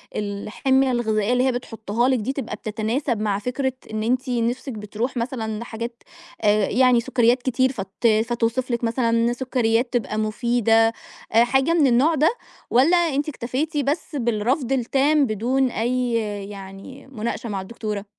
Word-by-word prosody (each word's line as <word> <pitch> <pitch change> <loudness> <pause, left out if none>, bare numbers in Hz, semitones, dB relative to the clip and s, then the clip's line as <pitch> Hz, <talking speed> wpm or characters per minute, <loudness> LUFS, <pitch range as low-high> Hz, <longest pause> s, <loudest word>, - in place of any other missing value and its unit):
الحمية 220 +6 0
الغذائية 220 -2 +1
اللي 250 0 +2
هي 265 - +3
بتحطها 235 -1 -2
لِك 260 -2 +2
دي، 235 +5 -2
تبقى 270 -5 -4
بتتناسب 225 +3 -2
مع 205 -2 0
فكرة 260 +4 -2 0.2
إن 215 0 -2
أنتِ 255 +3 0
نِفسِك 245 +2 -1
بتروح 220 +4 -4
مثلًا 230 -3 -3
لحاجات 235 0 -6 0.4
آآ 210 -2 +3
يعني 250 0 +4
سكريات 245 0 +2
كتير 260 +1 +1
فت 200 -1 -2 0.2
فتوصف 240 +2 -1
لِك 235 0 -1
مثلًا 230 0 +1
سكريات 240 -1 0
تبقى 225 -3 -1
مفيدة 225 +1 +2 0.4
آآ 230 +1 +6
حاجة 265 +6 +2
من 315 -5 +4
النوع 265 +7 +3
ده؟ 305 +2 +4 0.4
والّا 280 +9 +4
أنتِ 305 -4 0
اكتفيتِ 290 +4 -3
بس 295 +3 -1
بالرفض 240 +2 0
التام 275 +3 +2
بدون 250 +4 0
أي 245 +2 -1 0.4
يعني 195 +7 -10
مناقشة 235 -2 -4
مع 195 -2 -3
الدكتورة؟ 210 0 -5
240 Hz, 150 wpm, -23 LUFS, 220-260 Hz, 0.4 s, آآ